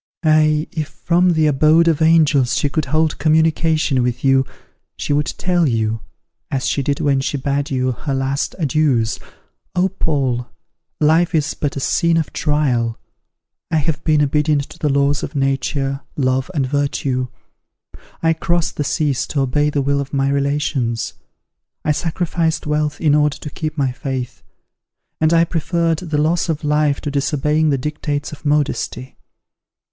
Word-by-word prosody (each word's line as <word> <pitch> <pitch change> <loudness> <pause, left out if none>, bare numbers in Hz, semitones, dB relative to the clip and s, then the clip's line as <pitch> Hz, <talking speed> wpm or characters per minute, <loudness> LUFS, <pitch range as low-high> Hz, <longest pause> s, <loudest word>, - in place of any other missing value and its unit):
Ah! 155 -1 +4
if 155 -3 -3
from 175 +3 +1
the 160 -1 +2
abode 155 +3 +4
of 160 -2 +2
angels 155 -6 +4
she 145 - +1
could 155 +1 -1
hold 155 +2 0
communication 155 -2 +2
with 125 0 -2
you, 135 0 +4 0.5
she - - -1
would 145 +2 +1
tell 175 -3 +1
you, 110 -1 0 0.5
as 135 -1 -1
she 140 - 0
did 140 +1 -1
when 140 -2 +2
she 140 - -2
bade 140 +1 -1
you 130 -1 0
her 135 +3 -3
last 135 +1 -1
adieus, 140 -8 +1 0.6
'O, 180 +1 +2
Paul! 135 -9 -1 0.5
life 165 +3 +3
is 155 -1 +1
but 145 -2 -3
a - - -2
scene 170 +4 +2
of 160 - -2
trial. 135 -7 0 0.7
I 160 - -1
have 150 0 -1
been 155 -2 +3
obedient 150 0 +1
to - - -14
the 150 - 0
laws 140 +1 +2
of 145 - -6
nature, 135 0 -1 0.2
love, 130 0 0
and 140 -3 +1
virtue. 135 -2 -1 1.0
I 165 0 +4
crossed 170 +1 -1
the 145 - 0
seas 145 -2 0
to 140 - -1
obey 145 +3 +1
the 145 -2 -1
will 140 +1 +1
of 140 +1 -6
my 135 0 +1
relations; 140 -4 -1 0.7
I 150 - +3
sacrificed 165 +1 -1
wealth 150 0 -1
in 150 -3 +3
order 150 -1 +2
to 150 - -8
keep 155 +1 -4
my 135 -3 +1
faith; 130 -1 -5 0.8
and 155 0 +3
I 165 0 +5
preferred 165 0 0
the 160 -4 -3
loss 165 +4 +1
of 160 -1 -2
life 150 -1 +1
to 145 - -3
disobeying 150 +2 +1
the 140 - +2
dictates 145 +1 -3
of 150 - -11
modesty. 145 -3 -1
150 Hz, 160 wpm, -19 LUFS, 135-155 Hz, 1.0 s, I